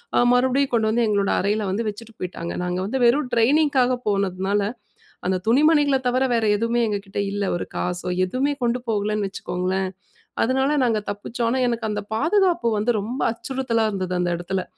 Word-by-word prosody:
அ, - - +3
மறுபடியும் 260 +2 +2
கொண்டு 220 -2 +2
வந்து, 235 +1 +2
எங்களோட 200 -2 +1
அறையில 210 +2 0
வந்து, 200 +5 -1
வச்சுட்டு 225 +2 -10
போயிட்டாங்க. 175 -2 -5
நாங்க 180 0 -2
வந்து, 255 +7 -2
வெறும் 255 +2 +3
டிரெய்னிங்க்காக 255 +1 +3
போனதுனால, 195 0 0 0.7
அந்த 185 -1 +1
துணிமணிகள 290 +2 +4
தவர, 255 +2 +2
வேற 230 -1 +1
எதுவுமே 230 +2 +1
எங்ககிட்ட 200 -1 -3
இல்ல. 205 0 -1
ஒரு - - -4
காசோ, 180 0 -2 0.2
எதுவுமே 265 +9 0
கொண்டு 240 +1 0
போகலன்னு, 210 -1 0
வச்சுக்கோங்களேன். 185 0 -2 0.5
அதனால, 265 +4 +1
நாங்க 220 -3 +1
தப்பிச்சோம். 230 +3 -3
ஆனா, 260 - 0
எனக்கு 230 -2 -2
அந்த 210 0 -3
பாதுகாப்பு 340 - +2
வந்து, 220 +4 +1
ரொம்ப 240 +6 -4
அச்சுறுத்தலா 235 -2 -1
இருந்தது, 185 -2 -3
அந்த 175 0 0
எடத்துல. 185 +2 -3
225 Hz, 160 wpm, -23 LUFS, 195-255 Hz, 0.7 s, துணிமணிகள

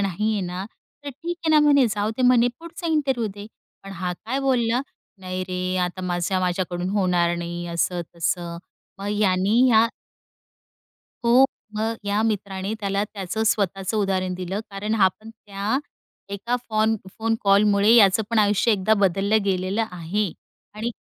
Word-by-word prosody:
नाही 200 +3 0
आहे 205 - -1
ना, 180 +2 -5 0.4
तर - - -4
ठीक 335 +6 -5
आहे 320 - +2
ना," - - +7
म्हणे. 280 -4 +5
"जाऊदे," 215 +4 -2
म्हणे, 245 -1 +5
"पुढचा 335 +1 -8
इंटरव्ह्यू 270 -7 +1
दे." 205 0 -9 0.4
पण 195 0 -9
हा 180 0 -3
काय 235 +9 -4
बोलला, 250 -2 +1 0.4
"नाही 185 0 -4
रे, 185 0 -2
आता 180 +1 -5
माझ्या 175 +1 -1
माझ्याकडून 180 0 -1
होणार 180 -4 +2
नाही 175 0 -5
असं 175 +1 0
तसं." 170 0 -2 0.4
मग 200 +1 -4
याने 195 +2 +2
या 225 +1 +5 1.4
हो, 245 +3 +6 0.3
मग 225 +1 -1
या 205 +1 +1
मित्राने 200 -2 -2
त्याला 200 0 0
त्याचं 210 +1 -4
स्वतःचं 195 -1 0
उदाहरण 190 -3 0
दिलं 185 +3 -4
कारण 210 +3 -2
हा 195 -4 +5
पण 215 +5 -14
त्या 210 +2 -3 0.5
एका 235 +5 -2
फॉन 220 0 +2 0.2
फोन 225 0 +1
कॉलमुळे 200 +1 +4
याचं 205 -1 +6
पण 230 - +2
आयुष्य 210 +2 +3
एकदा 210 +2 +2
बदललं 200 +2 +2
गेलेलं 190 +3 0
आहे. 180 +4 -2 0.5
आणि 220 +3 -3
200 Hz, 155 wpm, -23 LUFS, 185-225 Hz, 1.4 s, ना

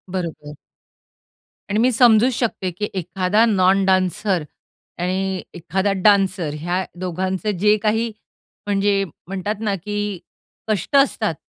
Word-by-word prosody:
बरोबर. 160 -5 -5 1.2
आणि 210 - +1
मी 250 +3 +4
समजू 235 0 +5
शकते 225 -6 -1
की 210 +5 -4
एखादा 185 +5 +1
नॉन 195 -3 +3
डान्सर 185 -1 +1 0.6
आणि 190 +1 -1
एखादा 185 +4 -1
डान्सर, 195 -5 +3
ह्या 175 +4 -1 0.2
दोघांचं 185 +3 -2
जे 210 +3 +4
काही 220 +2 +1 0.6
म्हणजे 200 0 +2 0.2
म्हणतात 195 +3 -3
ना 205 -3 0
की 205 0 -4 0.5
कष्ट 215 - -1
असतात 225 - +3
195 Hz, 115 wpm, -21 LUFS, 185-210 Hz, 1.2 s, समजू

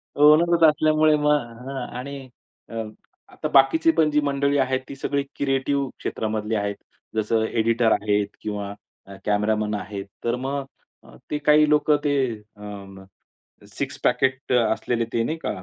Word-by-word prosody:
Owner 160 +3 +5
असल्यामुळे 155 0 +3
मग 135 -5 -1 0.3
आणि 140 +3 -6 0.5
अ, 115 - -7 0.5
आता - - -5
बाकीची 140 +4 +5
पण 160 -1 +2
जी 150 - +3
मंडळी 140 0 +1
आहेत, 130 -1 +1
ती 140 - -7
सगळी 140 +1 -1
क्रिएटिव्ह 135 0 0
क्षेत्रामधली 110 0 -2
आहेत. 100 -1 -1 0.4
जसं 110 +1 +1
एडिटर 115 0 +1
आहेत 105 0 +1
किंवा 100 -1 -4 0.5
कॅमेरामन 105 +1 +1
आहेत. 100 0 -6 0.2
तर 120 +1 0
मग 135 +2 -3 0.7
ते 150 - 0
काही 150 0 +4
लोकं 150 0 +4
ते 145 - +2 0.4
अ, 100 -2 -10 0.7
6 - - -4
पॅकेट 130 0 +1
असलेले 115 0 +1
ते 115 - +1
नाही 160 +6 -2
का, - - -4
130 Hz, 135 wpm, -23 LUFS, 110-150 Hz, 0.7 s, Owner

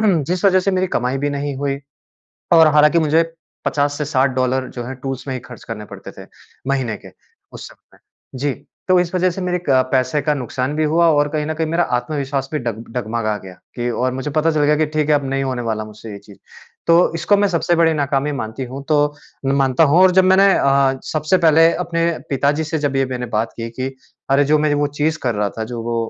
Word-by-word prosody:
जिस 180 -2 +1
वज़ह 190 -1 +5
से 195 - 0
मेरी 185 0 0
कमाई 125 +2 -1
भी - - 0
नहीं 145 0 -3
हुई 140 0 -2 0.7
और 165 -1 +7
हालाँकि 150 +2 +5
मुझे 160 0 +3 0.4
50 145 0 0
से 150 - -1
$60 130 -2 0
जो 120 - -4
हैं, 130 +2 -6
टूल्स 135 -1 -5
में 130 - -2
ही 130 - -4
खर्च 125 0 -13
करने 110 -2 -7
पड़ते - - -10
थे, - - -13 0.4
महीने 130 -5 -1
के, - - -14 0.4
उस - - -9
समय। - - -22 0.4
जी। 140 0 -1 0.3
तो 185 0 +5
इस 175 0 -3
वज़ह 185 0 +2
से 180 - -6
मेरे 180 0 -1
एक 175 - -7 0.3
पैसे 130 +2 +1
का 150 +1 +1
नुकसान 130 +1 -3
भी 155 - +1
हुआ 170 +1 +4
और 145 -1 +2
कहीं 150 0 -2
न 155 - -2
कहीं 160 0 -1
मेरा 165 +2 +1
आत्मविश्वास 135 0 -3
भी 155 - 0
डब 115 -3 -5
डगमगा 110 -2 -2
गया 95 -1 -10 0.2
कि 120 0 -2
और 125 +2 -1
मुझे 130 +3 -4
पता 155 +2 +2
चल 155 -2 +1
गया 150 +1 +3
कि, 155 +1 +1
ठीक 155 0 -1
है, 150 - +4
अब 145 -1 +1
नहीं 135 0 -1
होने 130 -2 -3
वाला 110 -2 -2
मुझसे 110 +1 -11
ये 100 - -8
चीज़। 100 0 -17 0.5
तो 170 0 +4
इसको 175 +5 +2
मैं 200 0 +2
सबसे 175 -1 +1
बड़ी 165 -1 +4
नाकामी 145 0 0
मानती 110 -1 -5
हूँ, 130 +3 -8
तो 145 -1 +2 0.3
मैं 135 - +2
मानता 135 +2 +3
हूँ 155 +4 +4
और 185 - +7
जब 190 - +6
मैंने 190 +1 +5
अ, 135 -1 +2
सबसे 155 +4 0
पहले 165 0 +5
अपने 170 -1 0 0.2
पिताजी 145 +3 +1
से 160 +1 -2
जब 145 -2 -1
ये 135 0 +2
मैंने 125 -1 -4
बात 110 +2 0
की 115 0 -5
कि, 130 +3 -4 0.4
"अरे! 140 +1 +4
जो 150 +2 +3
मैं 150 0 +1
वो 145 0 +1
चीज़ 155 +1 +1
कर 120 -3 0
रहा 105 0 0
था, 110 - -2
जो 115 0 -6
वो 115 0 -3
145 Hz, 235 wpm, -19 LUFS, 130-160 Hz, 0.7 s, और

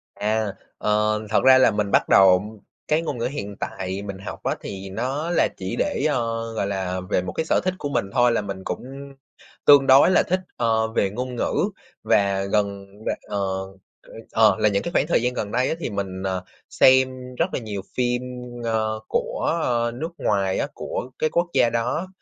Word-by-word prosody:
À. 105 -1 -1 0.2
Ờ, 105 0 +1
thật 110 - +2
ra 130 0 +8
là 130 - +5
mình 105 -1 -1
bắt - - +3
đầu 95 +3 +5 0.3
cái 155 +2 +2
ngôn 150 -6 -4
ngữ 115 - -2
hiện 105 -6 -4
tại 95 0 -4
mình 100 -1 -6
học 100 - -8
á - - 0
thì 95 0 -7
nó 130 - -3
là 175 - +3
chỉ 95 0 -4
để, 290 - 0
ờ, 115 -3 -2
gọi 105 -3 -1
là, 95 -2 -2
về 90 - +2
một 90 - -5
sở - - +2
thích 185 0 0
của 145 - -3
mình 140 - 0
thôi 125 -1 +4
là 115 - +1
mình 100 -2 -6
cũng - - -5 0.8
tương 140 -2 +7
đối 135 +6 +7
là - - +4
thích, 185 +1 0 0.2
ờ, 110 -1 +2
về 100 -3 0
ngôn 125 +4 -5
ngữ - - -1 0.5
và 100 -1 +2
gần 100 -1 -1
những 105 +2 -16
bạn, - - -2
ờ, 100 - -2 0.7
ơ, - - -15 0.2
ờ, 110 -3 +5
là 105 - +4
những 100 -1 0
cái 170 - -4
khoảng 150 - +2
thời 170 - +2
gian 125 +1 0
gần 105 -4 -4
đây 125 +3 +1
á, - - 0
thì 170 - -3
mình, 95 -2 -4
ờ, 95 -1 -2 0.3
xem 130 -1 +3
rất 170 +6 -1
là - - -1
nhiều 105 -4 -5 0.2
phim, 125 0 +1 0.4
ơ, 110 -1 0
của, 170 - -1
ơ, 120 -1 +1
nước 160 +6 -4
ngoài 100 -2 0
á, - - 0
của 125 - -5
cái 155 - +1
quốc 170 +2 +1
gia 125 -3 +4
đó, 120 +10 -1
110 Hz, 210 wpm, -23 LUFS, 100-130 Hz, 0.8 s, ra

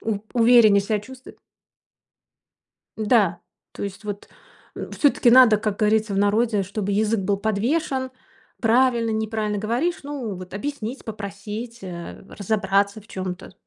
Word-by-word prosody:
у 220 -2 -2
увереннее 230 -4 +6
ся 210 +1 -1
чувствовать. 260 +4 -13 1.6
Да, 210 -6 +2 0.3
то - - -8
есть 200 +1 -6
вот, 205 -1 -6 0.5
э, - - -7
всё-таки 275 -4 +3
надо, 245 -3 +7
как 210 -1 -3
говорится 215 -1 +1
в - - 0
народе, 210 +1 +2
чтобы 200 +1 -3
язык 215 +1 +1
был 200 +1 0
подвешен. 260 +6 -1 0.5
Правильно, 235 0 +3
неправильно 220 -1 -2
говоришь, 245 - -1
ну, 275 -8 -5
вот 185 0 -10
объяснить, 255 +2 -5
попросить, 215 +2 -7
э, 175 0 -8
разобраться 200 0 0
в 210 - -20
чём-то. 185 -1 -6
215 Hz, 130 wpm, -23 LUFS, 200-235 Hz, 1.6 s, надо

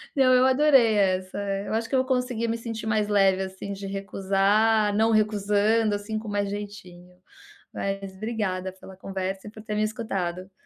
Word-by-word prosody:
Não, 260 -2 +5
eu 255 +1 +5
adorei 260 -5 +5
essa. 185 -1 0 0.3
Eu - - -4
acho 225 0 -1
que 270 - -1
eu - - +4
vou 260 - -1
conseguir 250 -3 0
me 230 - -1
sentir 225 -1 -6
mais 215 -1 +1
leve, 195 -2 +3
assim, 190 +1 -7
de 195 0 -7
recusar, 200 +2 +1
não 220 +2 +3
recusando, 210 0 +2
assim, 215 +2 -4
com 220 - -10
mais 205 -1 -1
jeitinho. 185 -3 -8 0.6
Mas 195 -1 -4
obrigada 190 -4 -3
pela 190 0 -13
conversa 195 +1 -5
e - - -8
por 215 -1 -12
ter 215 - -5
me 215 - +1
escutado. 190 -4 -3
205 Hz, 180 wpm, -25 LUFS, 195-225 Hz, 0.6 s, Não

